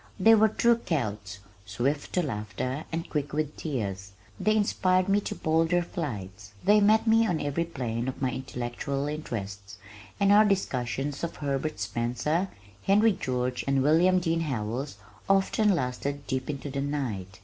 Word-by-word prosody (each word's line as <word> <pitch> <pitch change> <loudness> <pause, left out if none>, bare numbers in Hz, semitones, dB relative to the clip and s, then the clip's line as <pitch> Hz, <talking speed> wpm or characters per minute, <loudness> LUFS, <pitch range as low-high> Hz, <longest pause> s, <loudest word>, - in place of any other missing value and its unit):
They 225 +4 +7
were 220 0 +6
true 235 +2 +3
Celts, 105 - -2 0.3
swift 125 +9 -2
to 180 - +2
laughter 125 - -4
and 165 0 -3
quick 145 -2 -3
with 150 0 -1
tears; 100 - -4 0.3
they 215 0 +2
inspired 185 -3 +2
me 200 +1 +3
to - - -4
bolder 165 +2 +2
flights. 105 - -6
They 210 +1 +5
met 215 +2 +4
me 225 0 +4
on 170 -5 0
every 145 +4 -1
plane 120 -6 -3
of 130 - -4
my 130 -2 0
intellectual 130 +2 -3
interests, 105 -9 -5 0.4
and 200 0 +4
our 210 +1 +8
discussions 140 - -1
of 170 - -3
Herbert 145 0 -2
Spencer, 120 - -1 0.3
Henry 210 +3 +4
George, 125 -5 -2
and 135 -1 +2
William 175 +5 +4
Dean 165 -2 0
Howells 125 -3 -3 0.3
often 195 +1 +3
lasted 140 0 -3
deep 130 0 -3
into 145 -1 -4
the 140 0 -2
night. 115 -11 -3
140 Hz, 155 wpm, -28 LUFS, 120-175 Hz, 0.4 s, our